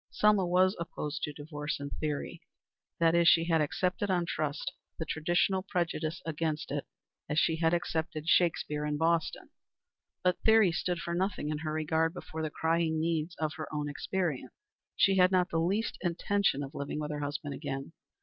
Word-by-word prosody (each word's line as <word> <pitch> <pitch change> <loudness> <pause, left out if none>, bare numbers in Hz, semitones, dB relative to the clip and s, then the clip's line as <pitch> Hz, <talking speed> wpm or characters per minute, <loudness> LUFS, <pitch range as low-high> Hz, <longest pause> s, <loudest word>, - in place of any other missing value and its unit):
Selma 210 -3 +3
was 185 +3 +4
opposed 155 -3 -4
to 150 - -2
divorce 150 0 -5
in 140 0 -5
theory. 150 -2 -3 0.6
That 165 -1 +4
is, 170 0 +4
she 165 - +6
had 165 -2 +3
accepted 180 +6 0
on 180 -2 +2
trust 155 +2 -2 0.2
the 160 - -3
traditional 175 +5 +1
prejudice 170 -3 -2
against 160 -1 -2
it 145 0 -3 0.4
as 150 - -1
she 160 0 +3
had 160 0 +2
accepted 160 -2 -2
Shakespeare 160 -4 +2
and 150 0 -1
Boston. 165 +1 0 0.7
But 180 -1 +2
theory 220 -4 +5
stood 175 +1 -1
for 170 - -3
nothing 185 -4 -1
in 150 -1 -2
her 155 0 -3
regard 160 +2 0
before 160 -2 -6
the 155 - -1
crying 160 +1 +1
needs 165 +1 -1
of 155 -1 -2
her 155 -2 -6
own 150 -1 -2
experience. 160 0 -2 0.4
She 195 -1 +4
had 180 0 +6
not 185 -1 +2
the 165 - +1
least 195 +7 0
intention 180 -3 +1
of 140 - -7
living 140 +1 -4
with 150 0 -3
her 150 - -3
husband 145 0 -3
again. 135 +1 -5
165 Hz, 180 wpm, -31 LUFS, 150-175 Hz, 0.7 s, she